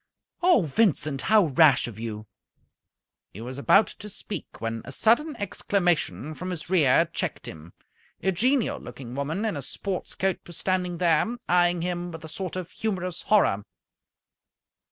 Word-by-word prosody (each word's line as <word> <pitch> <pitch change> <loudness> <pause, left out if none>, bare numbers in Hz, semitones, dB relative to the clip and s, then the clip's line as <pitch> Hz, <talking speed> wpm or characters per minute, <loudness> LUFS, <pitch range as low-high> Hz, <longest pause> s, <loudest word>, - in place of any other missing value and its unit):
"Oh, 350 - +5
Vincent, 155 -4 +1
how 215 -3 +4
rash 145 -3 +4
of 110 -3 -9
you!" 110 -2 -5 1.1
He 100 - -9
was 130 +3 -6
about 195 +9 +5
to 210 - -10
speak, 205 - -7
when 115 0 -3
a - - -9
sudden 240 - +2
exclamation 175 - -1
from 180 +4 -6
his 175 -1 -6
rear 150 -9 +5
checked - - -3
him. 80 +2 -10 0.5
A 190 - +2
genial 250 +7 +1
looking 125 -3 -9
woman 155 - -2
in 215 - -1
a 145 - -4
sports 190 +7 -4
coat 190 0 0
was 175 - -6
standing 180 -2 -1
there, 175 +7 +2
eyeing 175 -1 +3
him 175 0 -3
with 160 -1 -9
a - - -8
sort 185 +2 -5
of 185 -2 -5
humorous 185 -5 -3
horror. 170 - +3
175 Hz, 155 wpm, -26 LUFS, 140-195 Hz, 1.1 s, Oh